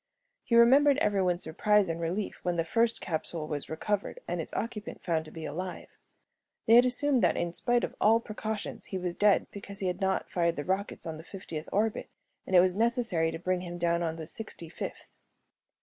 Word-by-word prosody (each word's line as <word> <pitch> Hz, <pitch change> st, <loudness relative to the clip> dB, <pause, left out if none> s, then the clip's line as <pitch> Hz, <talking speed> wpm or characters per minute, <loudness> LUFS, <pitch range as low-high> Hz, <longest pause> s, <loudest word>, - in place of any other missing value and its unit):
He 235 Hz, -, +1 dB
remembered 270 Hz, +4 st, +6 dB
everyone's 190 Hz, -, +1 dB
surprise 210 Hz, +5 st, +2 dB
and 165 Hz, 0 st, -3 dB
relief 180 Hz, +5 st, -2 dB
when 180 Hz, -1 st, -1 dB
the 165 Hz, -1 st, 0 dB
first 230 Hz, +6 st, +1 dB
capsule 160 Hz, -1 st, -3 dB
was 145 Hz, -2 st, -4 dB
recovered 205 Hz, -, -2 dB
and -, -, -2 dB
its -, -, -7 dB
occupant 220 Hz, -3 st, -5 dB
found 160 Hz, -2 st, 0 dB
to 155 Hz, -, -11 dB
be 160 Hz, -1 st, -7 dB
alive. 180 Hz, +4 st, -5 dB, 0.8 s
They 225 Hz, -, +5 dB
had 245 Hz, +2 st, +8 dB
assumed 260 Hz, +1 st, +1 dB
that -, -, +3 dB
in 170 Hz, -1 st, -1 dB
spite 240 Hz, +5 st, +1 dB
of -, -, -2 dB
all 225 Hz, +2 st, +5 dB
precautions 215 Hz, -1 st, -5 dB
he 190 Hz, -, -4 dB
was 180 Hz, -1 st, -3 dB
dead 205 Hz, +2 st, +3 dB
because 200 Hz, 0 st, -9 dB
he 195 Hz, -, -3 dB
had 180 Hz, +1 st, -2 dB
not 190 Hz, 0 st, 0 dB
fired 170 Hz, -1 st, 0 dB
the 145 Hz, -, -4 dB
rockets 195 Hz, +2 st, -2 dB
on 160 Hz, -1 st, -5 dB
the 160 Hz, -, -10 dB
fiftieth 170 Hz, -4 st, -7 dB
orbit 215 Hz, +2 st, 0 dB, 0.4 s
and 190 Hz, -, +1 dB
it 175 Hz, -, +9 dB
was 185 Hz, 0 st, +2 dB
necessary 225 Hz, -6 st, +1 dB
to 165 Hz, -, -4 dB
bring 180 Hz, +1 st, -1 dB
him 175 Hz, -1 st, -6 dB
down 170 Hz, 0 st, +1 dB
on 165 Hz, -1 st, -1 dB
the 160 Hz, -1 st, -6 dB
sixty 170 Hz, -3 st, -6 dB
fifth. -, -, -7 dB
185 Hz, 205 wpm, -29 LUFS, 170-220 Hz, 0.8 s, it